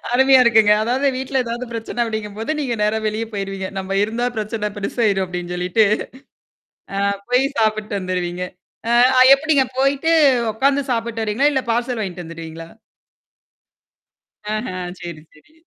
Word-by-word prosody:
அருமையா 265 +1 +6
இருக்குங்க. 220 -3 +5
அதாவது 255 +5 0
வீட்ல 265 0 -1
ஏதாவது 235 +2 -4
பிரச்சனை 230 +1 -6
அப்டிங்கும்போது, 220 +1 -5
நீங்க 250 -5 -1
நேரா 215 +1 +1
வெளியே 215 +2 -2
போயிருவீங்க. 195 -2 -4
நம்ம 195 +1 -3
இருந்தா 230 +3 -1
பிரச்சனை 215 0 -2
பெருசாயிரும் 200 -1 0
அப்படின்னு 180 0 -5
சொல்லிட்டு. 180 +5 +2 1.1
ஆ - - -1 0.3
போய் 250 +2 +3
சாப்பிட்டு 215 -1 0
வந்துருவீங்க. 180 -1 -3 0.5
அ - - +1 0.3
அ - - +7
எப்படிங்க 285 -2 +2
போயிட்டு 275 +4 +2 0.4
உட்காந்து 275 +4 +1
சாப்பிட்டு 230 -1 -2
வருவீங்களா? 255 +8 +2
இல்ல 265 - 0
பார்சல் 240 0 -1
வாங்கிட்டு 180 -3 -5
வந்துருவீங்களா? 165 0 -9 1.9
ஆஹ 215 +4 -3 0.3
சரி, 170 -3 -7
சரி. 155 - -23
220 Hz, 135 wpm, -20 LUFS, 195-250 Hz, 1.9 s, அ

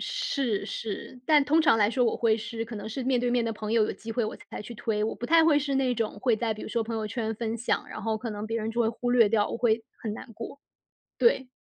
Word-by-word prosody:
是 275 - -1
是。 225 +3 -5
但 300 -2 +5
通 310 +3 +4
常 290 -7 +5
来 210 0 +3
说 250 0 +2
我 225 - +1
会 225 -2 +3
是 230 0 -4
可 230 -1 -7
能 205 +1 -6
是 255 +4 -4
面 255 -1 +2
对 245 0 0
面 245 -1 +2
的 225 - -1
朋 215 0 -4
友， 225 -2 +4
有 - - -2
机 225 0 -7
会 240 -2 0
我 215 - -4
才 - - -9
去 235 - -8
推。 210 -1 -1
我 220 - -1
不 240 - -5
太 330 +2 +6
会 305 -3 +5
是 280 -1 -1
那 260 -2 +2
种 220 -2 -2
会 240 -4 +3
在 225 -1 -1
比 215 - -9
如 - - -6
说 230 +1 0
朋 225 0 -3
友 215 -1 -2
圈 225 0 -2
分 225 +1 -3
享， 235 - -1
然 - - -7
后 220 -1 0
可 230 +1 -5
能 210 +1 -5
别 225 +1 -2
人 220 +1 -2
就 235 +1 -1
会 225 - +3
忽 245 +2 -2
略 235 -4 +6
掉， 210 -1 +2
我 - - -3
会， 230 -1 +2 0.2
很 215 -2 -4
难 230 - -10
过。 230 +6 -8 0.6
对。 265 - +3
230 Hz, 310 characters per minute, -27 LUFS, 220-250 Hz, 0.6 s, 太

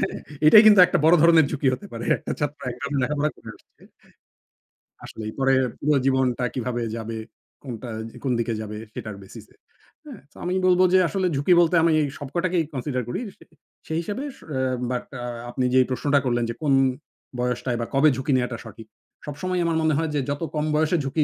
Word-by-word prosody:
হ্যাঁ? - - -10 0.2
এটাই 210 +8 +9
কিন্তু 205 -2 +7
একটা - - 0
বড় 165 +2 +7
ধরনের 165 -2 +6
ঝুঁকি 145 -3 -1
হতে 200 - -6
পারে। 115 0 -6
একটা - - -6
ছাত্র 145 0 -3
একরকম 140 +4 -6
লেখাপড়া 150 +2 0
করে - - -13
আসছে। - - -27 1.2
আসলেই। 110 -1 -7
পরে 135 0 +3 0.2
পুরো 150 0 +1
জীবনটা 130 -2 +1
কিভাবে 125 -1 -3
যাবে, 115 0 -5 0.5
কোনটা 125 -2 -7 0.3
এ - - -9
কোন 130 - +1
দিকে 115 0 -1
যাবে 105 0 -7 0.2
সেটার 110 -5 -7
basis 95 - -12
এ। - - -27 0.5
হ্যাঁ? 275 - -10
সো - - -25
আমি 180 +1 -1
বলবো 185 0 +4
যে 185 - +6
আসলে 190 +3 -1
ঝুঁকি 145 +6 +2
বলতে 170 +1 +2
আমি 165 -1 +3
এই - - 0
সবকটাকেই 170 +4 -1
consider 130 0 -2
করি। 120 - -3 0.2
সে - - -17 0.4
সেই 160 - -2
হিসেবে 205 +9 -5
স - - -20
অ্যা 130 -3 -1 0.3
বাট 125 - -3 0.2
আ - - -3 0.2
আপনি 130 +1 -2
যেই 130 0 +6
প্রশ্নটা 140 +2 +1
করলেন 120 -1 +1
যে - - -4
কোন 145 -3 +2 0.7
বয়সটায় 125 0 -1
বা 115 - -2
কবে 140 +3 +5
ঝুঁকি 135 +2 -2
নেওয়াটা 125 -2 -2
সঠিক? 110 0 -11 0.4
সবসময়ই 175 +5 -2
আমার 165 -1 0
মনে 155 -1 +2
হয় 160 -1 -1
যে 145 - +1
যত 145 +3 -3
কম 150 - -1
বয়সে 155 +3 +2
ঝুঁকি 140 +3 0
140 Hz, 200 wpm, -23 LUFS, 125-160 Hz, 1.2 s, এটাই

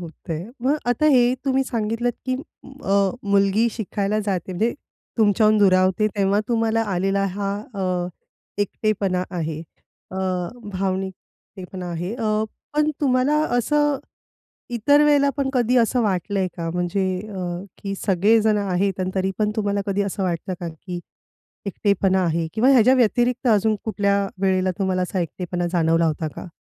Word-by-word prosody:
होतंय. 165 -1 -6 0.2
मग 275 +4 +2
आता 245 +5 +2
हे 245 -1 +4
तुम्ही 270 -1 +2
सांगितलत 230 0 -1
की 255 - +1 0.5
अ, 195 0 +3
मुलगी 200 +3 +3
शिकायला 210 -1 -2
जाते. 190 -3 -2
म्हणजे 220 +6 0 0.5
तुमच्याहून 215 0 +4
दुरावते 190 +1 +4
तेव्हा 200 +1 +2
तुम्हाला 225 -1 +1
आलेला 195 +2 +1
हा 200 0 -2 0.2
अ, 180 -2 -1 0.5
एकटेपणा 200 -3 -1
आहे. 160 -4 -3 0.5
अ, 185 - -7 0.6
भावनिक 190 0 -1 0.4
एकटेपणा 185 0 -7
आहे. 175 +5 -3
अ, 215 -2 0 0.3
पण 300 0 +2
तुम्हाला 260 0 +2 0.2
असं 295 +3 +2 0.8
इतर 285 +6 +4
वेळेला 285 -1 +4
पण 270 -1 0
कधी 250 -1 +2
असं 240 +1 +3
वाटलं 195 0 -1
आहे 190 - +1
का 165 -1 -3
म्हणजे 180 +2 0 0.2
अ, 195 -3 -5 0.4
की 195 -1 -5
सगळे 205 +4 +4
जण 215 -1 +3
आहेत 195 -1 0
आणि 185 0 -1
तरी 190 0 0
पण 210 -1 +1
तुम्हाला 205 -2 0
कधी 200 0 0
असं 200 0 -3
वाटतं 180 0 -2
का 175 - -4
की 175 +2 -7 0.7
एकटेपणा 195 -1 +1
आहे? 165 0 0
किंवा 245 +5 +4
ह्याच्याव्यतिरिक्त 250 0 +3
अजून 215 0 +3
कुठल्या 200 -2 +1 0.2
वेळेला 185 -1 +2
तुम्हाला 190 -2 0
असा 180 +1 -2
एकटेपणा 175 +1 -3
जाणवला 165 -1 +3
होता 160 0 -1
का? - - -8
200 Hz, 145 wpm, -22 LUFS, 185-225 Hz, 0.8 s, हे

